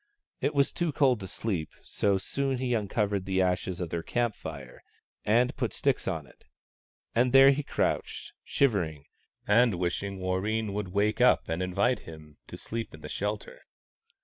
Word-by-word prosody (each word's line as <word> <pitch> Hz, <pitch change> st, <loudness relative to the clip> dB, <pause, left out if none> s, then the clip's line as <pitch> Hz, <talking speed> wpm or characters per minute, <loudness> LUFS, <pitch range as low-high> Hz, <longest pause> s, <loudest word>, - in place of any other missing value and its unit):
It -, -, -1 dB
was 140 Hz, -1 st, +3 dB
too 170 Hz, -2 st, -1 dB
cold 135 Hz, -5 st, +3 dB
to 95 Hz, -, -6 dB
sleep, 90 Hz, -7 st, -3 dB
so 100 Hz, -, +1 dB
he -, -, +3 dB
soon 135 Hz, +4 st, -1 dB
uncovered 105 Hz, -3 st, 0 dB
the 95 Hz, -1 st, 0 dB
ashes 90 Hz, 0 st, -1 dB
of 90 Hz, -3 st, -4 dB
their 85 Hz, -, -2 dB
camp 120 Hz, +5 st, 0 dB
fire, 70 Hz, -9 st, -9 dB, 0.4 s
and 120 Hz, +5 st, +3 dB
put 120 Hz, -4 st, -2 dB
sticks 140 Hz, -2 st, 0 dB
on 80 Hz, -6 st, -2 dB
it; -, -, -21 dB, 0.7 s
and 125 Hz, +2 st, +2 dB
there 135 Hz, 0 st, +9 dB
he 140 Hz, +2 st, 0 dB
crouched, 145 Hz, -, -2 dB
shivering, 85 Hz, -, 0 dB, 0.4 s
and 115 Hz, 0 st, +4 dB
wishing 90 Hz, +3 st, -2 dB
Warreen 100 Hz, +3 st, -1 dB
would 105 Hz, -1 st, -2 dB
wake 100 Hz, +5 st, 0 dB
up 125 Hz, -, +4 dB
and 80 Hz, +2 st, -2 dB
invite 105 Hz, +7 st, +1 dB
him 80 Hz, -2 st, -12 dB
to -, -, -9 dB
sleep 115 Hz, 0 st, -5 dB
in -, -, -15 dB
the -, -, -8 dB
shelter. -, -, -4 dB
105 Hz, 170 wpm, -28 LUFS, 90-125 Hz, 0.7 s, there